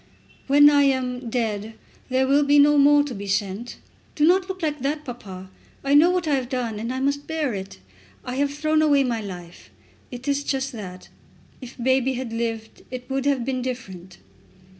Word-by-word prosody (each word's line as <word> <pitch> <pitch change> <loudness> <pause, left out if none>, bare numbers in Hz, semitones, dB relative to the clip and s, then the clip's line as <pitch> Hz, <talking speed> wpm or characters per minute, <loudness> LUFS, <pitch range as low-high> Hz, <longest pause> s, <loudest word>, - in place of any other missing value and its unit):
"When 290 +1 +7
I 285 -1 +4
am 255 -2 -1
dead 220 -2 -2 0.3
there 260 +1 +2
will 280 +2 +3
be 290 +1 +4
no 290 0 +6
more 290 +1 +6
to 290 -3 -6
be 200 -2 -7
sent. 200 +4 -2 0.4
Do 300 - +3
not 370 +3 +3
look 375 -2 -6
like 300 -2 -1
that, 295 +3 -2
papa. 190 -7 -9 0.3
I 275 +1 +1
know 305 +4 +7
what 360 -2 0
I 295 - +2
have 260 -3 -1
done, 240 -5 -3
and 230 +3 -3
I 260 - -3
must 280 +1 -1
bear 315 -6 -1
it. 190 - -7 0.5
I 250 +1 -4
have 285 0 +1
thrown 310 +2 +1
away 290 -3 +4
my 235 -3 -1
life. 180 -4 -10 0.4
It 250 +2 -9
is 285 0 0
just 270 -1 -2
that. 185 -6 -9 0.5
If 255 -1 -10
baby 260 +1 +1
had 245 -2 -5
lived 225 -1 -4
it 250 0 -7
would 270 0 -1
have 270 -4 +1
been 255 -1 -2
different." 190 -8 -7
260 Hz, 195 wpm, -23 LUFS, 230-285 Hz, 0.5 s, When